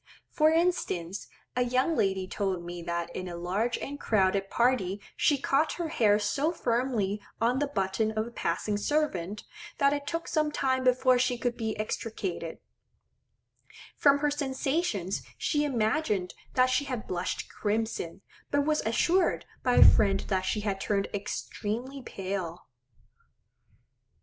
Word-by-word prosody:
For 310 0 +4
instance, 315 - 0 0.3
a 250 - +1
young 255 +6 +2
lady 190 -4 +1
told 190 -3 -2
me 175 0 -6
that 170 0 -3
in 185 - -4
a 175 - -5
large 195 +8 -1
and 285 +1 -6
crowded 195 -2 +2
party 235 -6 +1 0.2
she 310 -5 +3
caught 285 +3 +2
her 340 -2 -3
hair 210 -8 +4
so 275 +10 0
firmly 235 - 0 0.2
on 240 +3 +2
the 290 - +1
button 200 -3 0
of 215 0 -1
a 235 - -9
passing 210 -2 -1
servant, 210 - -1 0.3
that 280 0 +4
it 285 0 -3
took 330 +2 -3
some 305 -2 +1
time 260 -2 0
before 255 0 +4
she 250 0 +1
could 245 0 -1
be 220 -2 -3
extricated; 210 -6 -4 1.4
from 280 -1 +5
her 295 0 +1
sensations 270 - -1 0.2
she 295 -2 +1
imagined 220 - 0 0.2
that 255 0 +4
she 285 +3 +2
had 250 -5 -4
blushed 180 0 -3
crimson; 210 -4 -2 0.3
but 285 0 +2
was 305 0 +2
assured 345 +11 +2 0.2
by 250 -1 +2
a - - +9
friend 195 -2 +5
that 190 -2 +1
she 210 - 0
had 200 -2 -2
turned 200 -1 0
extremely 230 +6 -4
pale. 185 -6 -5
230 Hz, 145 wpm, -29 LUFS, 195-280 Hz, 1.4 s, a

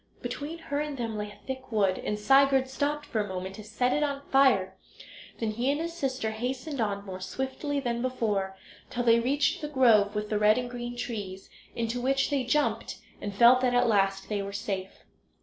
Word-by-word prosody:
Between 310 +3 -4
her 285 -3 -3
and 295 -2 -3
them 230 -3 -3
lay 210 0 -4
a 205 - -13
thick 260 -1 -6
wood, 200 -4 +2
and 210 - -2
Sigurd 270 +4 +4
stopped 290 +2 -2
for 220 - -1
a 205 - -3
moment 190 0 -5
to 215 - -8
set 240 +4 0
it 295 - +1
on 280 -1 -1
fire; 220 -9 +4 0.6
then 225 -2 -1
he 240 +5 -1
and 290 - -1
his 335 +1 -3
sister 260 -8 -2
hastened 255 +5 -3
on 200 -2 -1
more 185 -1 -6
swiftly 265 +8 -3
than 240 -3 -2
before, 210 -7 -1 0.3
till 245 - -2
they 230 -1 +5
reached 285 +8 +1
the 300 - -3
grove 225 -8 +4
with 210 0 -2
the 210 - +1
red 210 +2 +5
and 245 -1 -3
green 240 0 -5
trees, 205 -6 -5 0.2
into 235 +1 -2
which 270 +3 +1
they 275 -2 +1
jumped, 295 +4 0 0.2
and 205 -1 -5
felt 240 +4 +7
that 250 -1 +2
at 245 0 +4
last 195 -2 +2
they 205 -1 -1
were 200 0 -5
safe. 195 -1 -5
240 Hz, 205 wpm, -28 LUFS, 210-270 Hz, 0.6 s, felt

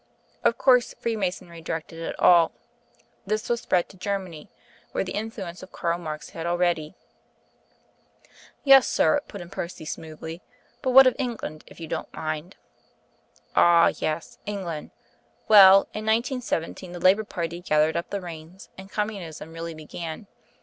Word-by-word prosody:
Of - - +3
course, 250 -2 +4
Freemasonry 185 -6 -3
directed 165 0 -5
it 165 - -5
all. 170 -2 +6 0.7
This 215 +2 0
spread 230 -8 0
to 190 - -15
Germany, 185 -5 -4 0.4
where - - 0
the 185 - -6
influence 205 -5 -5
of 185 - -12
Karl 170 +1 -2
Marx 155 -3 -6
had 165 0 -5
already 175 -2 0 0.8
" - - -39 0.7
"Yes, 270 -2 +7
sir," 290 0 +3
put 200 - -8
in 175 - -11
Percy 170 -2 -6
smoothly, 160 +1 -7 0.4
"but 260 - -1
what 265 +1 +9
of 255 - +4
England, 230 - -4
if - - -15
you 165 - -6
don't - - -5
mind 155 +3 -4 0.5
" - - -36
"Ah, 170 -1 +6
yes; 155 +1 -3
England. 180 -7 -4 0.6
Well, 195 -2 +9
in 215 - -5
1917 220 - -1
the 175 - -6
Labour 190 +5 +4
party 170 -4 -4
gathered 155 -2 +2
up 170 +1 -3
the 200 -1 -3
reins, 170 +1 -10
and 190 0 -10
Communism 190 -7 -5
really 165 0 -6
began. 160 +4 -7
175 Hz, 150 wpm, -25 LUFS, 165-210 Hz, 0.8 s, what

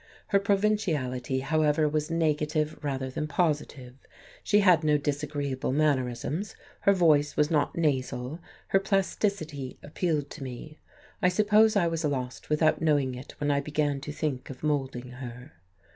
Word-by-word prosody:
Her 200 - +4
provinciality, 165 - 0
however, 155 +1 +2
was 150 +1 -1
negative 155 -1 0
rather 135 -2 -2
than 150 +3 -3
positive, 150 -5 -1 0.5
she 210 0 +4
had 180 -5 +5
no 150 -1 +4
disagreeable 145 -2 -2
mannerisms, 145 - 0 0.2
her 200 - +4
voice 155 -6 +3
was 150 +2 +2
not 150 0 +1
nasal; 135 -2 -1 0.3
her 195 - +4
plasticity 195 -8 -1
appealed 150 -2 -2
to 145 - -7
me. 135 +4 -8 0.4
I 180 - +4
suppose 215 +3 +4
I 195 -4 +3
was 165 0 -2
lost 130 -4 -3
without 155 +1 +2
knowing 145 -5 +2
it 125 +3 -9
when 145 0 +1
I 140 - +2
began 145 -1 -1
to 150 - -5
think 145 -4 -3
of 130 0 -10
moulding 135 -4 -1
her. 125 0 -9
150 Hz, 145 wpm, -28 LUFS, 135-165 Hz, 0.5 s, had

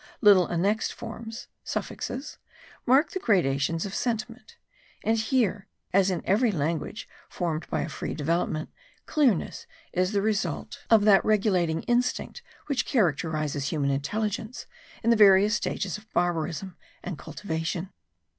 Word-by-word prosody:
Little 200 -5 +6
annexed 200 +6 0
forms 225 0 -8 0.2
(suffixes) 275 +4 -5 0.5
mark 285 +6 +4
the 375 - -3
gradations 165 - +1
of 195 - -6
sentiment; 240 - -3 0.5
and 225 - +2
here, 220 -3 0 0.3
as 195 0 +4
in 180 -3 -2
every 220 +4 +3
language 165 +4 -2 0.2
formed 165 -3 -3
by - - -1
a - - -2
free - - -5
development, 155 0 -1 0.3
clearness 265 - +1 0.3
is 185 +1 +1
the 200 -2 +1
result 205 -7 -2
of 220 -2 +5
that 200 -2 +6
regulating 185 -6 +2
instinct 250 - 0 0.2
which 280 -3 0
characterises 155 - 0
human 145 -3 0
intelligence 210 - -3 0.4
in 230 - +4
the - - +6
various 205 -1 +6
stages 205 -3 -2
of 220 +1 -23
barbarism 175 +1 -1 0.3
and 175 -5 -5
cultivation. 165 0 -4
195 Hz, 130 wpm, -27 LUFS, 165-225 Hz, 0.5 s, Little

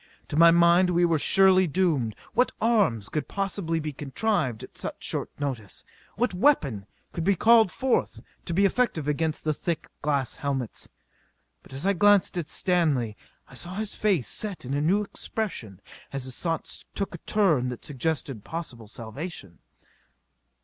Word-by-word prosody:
To - - -3
my 170 +2 +8
mind 170 +2 +5
we 175 0 +3
were 165 -2 +2
surely 190 +2 +5
doomed. 150 - +1 0.2
What 250 - +3
arms 205 - +2
could 150 - -3
possibly 195 -4 -2
be 155 -1 -4
contrived 140 - -1
at - - -12
such - - -5
short - - -1
notice? 125 -9 -4 0.3
What 240 0 0
weapon 145 - +2 0.3
could 170 - -3
be 195 +3 +3
called 225 0 +5
forth 265 -1 0 0.3
to 170 - -3
be 200 +2 +4
effective 195 - +1
against 155 +1 -1
the 155 - +1
thick 165 +2 -3
glass 140 -3 -1
helmets? 135 -5 -3 0.7
But - - -18
as 135 +6 -4
I 200 - +3
glanced 205 +1 +4
at 170 -3 -3
Stanley 150 - +1 0.3
I - - -17
saw 175 +8 -4
his 215 0 -3
face 190 - +1
set 205 -9 -4
in 130 - -3
a 145 - 0
new 190 +7 +2
expression 185 - -5 0.3
as 135 -1 -3
his 130 0 -3
thoughts 165 -2 -3
took 195 - -2
a 170 - -7
turn 160 -14 +2
that 125 - -7
suggested 135 -5 -2
possible 125 -9 -6
salvation. 110 - -8
165 Hz, 165 wpm, -26 LUFS, 135-195 Hz, 0.7 s, my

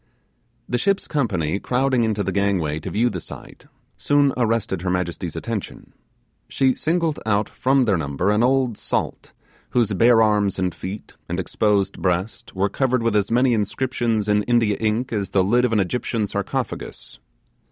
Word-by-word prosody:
The 120 - -1
ship's 195 +7 0
company, 100 - -1
crowding 130 0 +1
into 105 -2 0
the - - -2
gangway 95 -7 0
to 80 - -6
view 115 +3 +1
the - - -5
sight, 140 +4 -11 0.3
soon 145 -2 +2
arrested 115 -6 0
her 90 - -2
majesty's 90 -2 -2
attention. 105 +4 -6 0.6
She 135 -1 +2
singled 165 0 0
out 105 -1 +1
from 135 0 +1
their 100 -5 +2
number 75 +6 -1
an 105 +1 +2
old 125 -2 +1
salt, - - -3 0.4
whose 115 -4 +1
bare 115 +3 +5
arms 105 -2 +2
and 90 -2 -1
feet, 100 +3 -7 0.2
and 85 +2 -2
exposed 100 +1 0
breast, 90 +4 -2
were 95 +2 +1
covered 130 +1 0
with 115 -2 +1
as 105 -1 +2
many 125 +2 +3
inscriptions 115 0 -1
in 105 0 +3
India 115 -4 +2
ink 110 +3 -1
as 100 -3 -2
the 95 - +2
lid 120 +6 +3
of 125 - 0
an 110 - +2
Egyptian 110 +3 -1
sarcophagus. 100 - -4
110 Hz, 165 wpm, -22 LUFS, 95-125 Hz, 0.6 s, bare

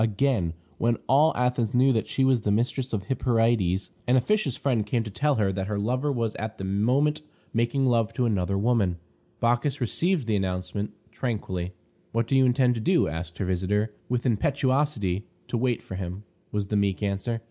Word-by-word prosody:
Again: 110 -6 +1 0.2
when 115 0 +2
all 150 +5 +5
Athens 125 -2 +1
knew 130 +2 +5
that 110 - 0
she 135 - +1
was 130 -3 +3
the 105 - -1
mistress 125 +5 0
of 105 -4 -2
Hyperides, 115 -7 +1 0.2
an 125 - +4
officious 135 - +1
friend 125 -6 +1
came 115 +3 0
to 110 - -7
tell 145 +7 +1
her 100 -3 +1
that 95 0 -3
her 105 -1 -2
lover 125 +8 0
was 115 -4 -1
at 110 +1 -5
that - - -6
moment 125 +11 +1 0.3
making 120 +4 +1
love 115 -3 +2
to 125 - +1
another 100 -3 0
woman. 100 -5 +2 0.4
Bacchis 120 +4 +1
received 160 - 0
the 110 -2 +1
announcement 95 +2 -2 0.2
tranquilly. 95 -7 -3 0.4
"What 115 +1 +1
do 135 - 0
you 130 -1 +5
intend 125 0 +3
to 115 - -3
do?" 175 +8 +3
asked 85 +1 -5
her 95 - -1
visitor, 100 +4 0 0.2
with 125 -1 -1
impetuosity. 130 - +1 0.2
"To 120 - 0
wait 125 -1 0
for - - -8
him," 95 +1 -5 0.3
was 105 -1 -1
the 105 - 0
meek 100 0 0
answer. 100 +4 -1
115 Hz, 190 wpm, -26 LUFS, 100-130 Hz, 0.4 s, all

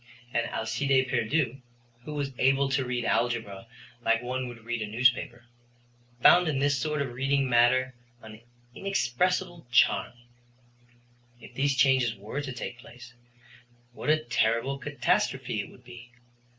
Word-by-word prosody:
And 120 - 0
Alcide 130 +4 0
Pierdeux, 130 +2 0 0.5
who 150 - -6
was 140 -2 -3
able 135 +1 +3
to 135 0 +1
read 125 -1 -3
algebra 115 -4 -1 0.4
like 115 +1 +2
one 130 +1 -3
would 120 -2 -11
read 120 -1 -3
a 110 - -3
newspaper, 120 +1 +1 0.8
found 180 0 +7
in 150 -3 0
this 145 +1 +2
sort 150 +1 -1
of 125 -3 -6
reading 135 +2 +1
matter 130 +1 +3 0.3
an 110 0 -12 0.3
inexpressible 180 0 -1
charm. 120 0 +3 1.3
If - - -14
these 140 0 +1
changes 130 -4 +3
were 105 +8 -5
to 140 -2 -5
take 120 -1 -7
place, 120 0 -14 0.8
what 145 - -5
a 155 - +5
terrible 120 +3 0
catastrophe 140 - -1
it 100 - -9
would 125 - -18
be! 120 -1 -12
130 Hz, 140 wpm, -27 LUFS, 120-140 Hz, 1.3 s, found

